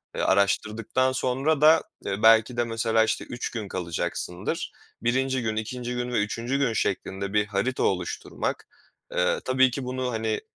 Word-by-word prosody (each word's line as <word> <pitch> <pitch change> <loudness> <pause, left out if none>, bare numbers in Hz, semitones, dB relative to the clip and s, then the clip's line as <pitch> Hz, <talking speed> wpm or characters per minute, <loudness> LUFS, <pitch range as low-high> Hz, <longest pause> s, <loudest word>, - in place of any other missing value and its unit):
eee, - - -1
araştırdıktan 110 +6 +1
sonra 135 +4 0
da, 160 +2 +7 0.2
eee, 100 +1 -3
belki 115 +2 +6
de 120 - +3
mesela, 115 -1 +1
işte, 110 -1 -1
3 120 - -4
gün 110 -4 -4
kalacaksındır. 85 -1 -3 0.3
1'inci 130 +2 +1
gün, 110 -2 -1
2'nci 120 +3 -4
gün 125 0 -3
ve - - +2
3'üncü 120 +5 -2
gün 135 -5 +1
şeklinde 100 -1 -2
bir 105 0 +3
harita 105 +6 -1
oluşturmak, 90 -2 -2 0.5
eee, 90 - +2
tabii 130 0 +4
ki 135 +2 -4
bunu, 130 0 -2
hani, 110 -1 -1
115 Hz, 160 wpm, -26 LUFS, 105-130 Hz, 0.5 s, da